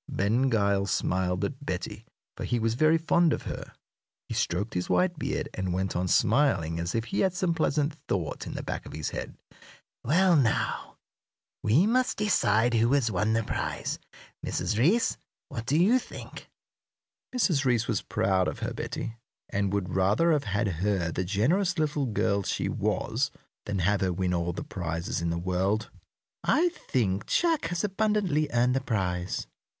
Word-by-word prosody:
Ben 115 +7 +1
Gile 100 -3 +2
smiled 90 -1 0
at 140 0 -6
Betty, 105 -1 -5 0.3
for - - -6
he 120 - 0
was 115 0 +1
very 155 +6 +4
fond 165 0 +3
of - - -3
her. - - -6 0.6
He - - -4
stroked 100 +6 -1
his 90 0 -2
white 175 -3 +2
beard, - - -2
and 95 -1 -2
went 95 0 -1
on 90 +1 0
smiling 85 - +2
as 85 +4 -2
if 115 - +1
he 195 - -2
had 190 -2 +2
some 175 -1 +1
pleasant 150 -2 +1
thought 90 -5 -2
in - - -6
the - - -4
back - - -5
of - - -9
his 75 -1 -3
head. - - -6 0.7
"Well, 175 +7 +4
now, 125 -7 0 0.6
we 125 - +4
must 250 +3 +2
decide 120 - +2
who 115 +1 +3
has 130 -6 +2
won 105 +3 +1
the 115 0 +1
prize. - - -3 0.4
Mrs. - - -1
Reece, 175 - +3 0.3
what 115 0 -6
do 145 - +2
you 210 +10 +5
think?" - - -10 0.9
Mrs. 170 - +2
Reece 120 -3 +2
was 105 -5 0
proud 95 -1 +1
of - - -3
her - - -3
Betty, 115 0 -5 0.3
and 100 -1 0
would 100 -3 -2
rather 100 - +3
have 150 -3 +1
had 105 +2 0
her 95 -1 0
the 95 - -1
generous 160 - +1
little 150 -3 0
girl 100 -2 +1
she - - -2
was - - 0 0.4
than 105 -1 -1
have 95 +3 +1
her 95 -1 +1
win 90 0 -1
all 85 0 0
the 85 - -5
prizes 85 -1 -3
in 85 - 0
the 85 - -1
world. 95 +5 0 0.5
"I 335 +6 +3
think 115 - -1
Jack 330 - +2
has 170 0 -2
abundantly 200 -7 +1
earned 125 +1 +2
the 135 - +1
prize." 90 -7 -2
110 Hz, 175 wpm, -28 LUFS, 95-155 Hz, 0.9 s, you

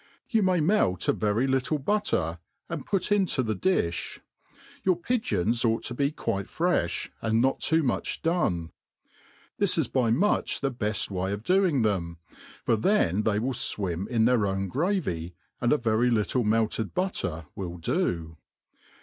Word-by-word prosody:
You 225 -3 +3
may 185 -2 +2
melt 150 - +2
a - - +4
very 105 +4 +1
little 135 +3 +1
butter, 140 - 0 0.3
and 160 -5 -5
put 195 -1 0
into 190 -10 +2
the 110 -2 -1
dilh. 90 - -1 0.7
Your 185 -1 +3
pigpons 120 - 0
ought 115 -1 +1
to 120 - -3
be 140 +3 +1
quite 100 -10 -3
frefh, 165 - 0
and 110 +1 +2
npt 135 +1 +1
too 160 0 +2
much 125 - -2
done. 95 - 0 0.9
This - - +2
is - - +1
by 125 -4 +1
much 180 - +1
the 135 - 0
heft 105 -1 -1
way 95 0 -2
of 100 +1 -4
doing 180 -8 +3
them, 85 -6 -1 0.5
for 115 - +3
then 110 - +2
they 105 -1 +1
will 125 +5 -1
fwim 95 -5 0
in 115 -2 +2
th^ir 125 +1 +4
pwti 95 -2 -1
gravy, 125 - -1 0.3
and 120 - +2
a - - +5
very 115 -1 +2
littlq 115 +1 +1
melted' 110 0 0
butter 90 - -2
will 90 -3 -5
do. 80 -1 -2
115 Hz, 160 wpm, -27 LUFS, 95-160 Hz, 0.9 s, a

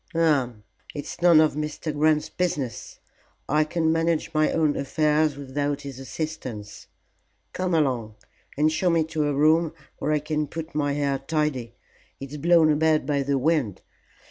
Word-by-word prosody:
"Hum! 140 -10 +1 0.3
It's 145 - -7
none 170 -2 +7
of 155 -1 +4
Mr. 150 +1 -4
Grant's 150 +1 +2
business. 145 - -3 0.5
I 150 +2 +3
can 160 +1 0
manage 165 0 0
my 155 0 +2
own 155 -3 +1
affairs 150 +1 +1
without 145 +1 -3
his 140 -2 -8
assistance. 130 -7 -6 0.7
Come 185 -2 -1
along 125 -8 0 0.4
and 155 +2 +3
show 180 +3 +1
me 165 -1 +3
to 155 -1 -2
a 145 - 0
room 155 +3 +3 0.3
where 150 - -1
I 155 - +3
can 150 0 -2
put 160 +2 -7
my 145 -1 0
hair 140 -1 0
tidy; 135 -5 -2 0.4
it's 140 +2 -7
blown 165 0 +4
about 155 -1 +2
by 140 -1 0
the 140 0 0
wind. 135 - 0
150 Hz, 155 wpm, -25 LUFS, 140-160 Hz, 0.7 s, none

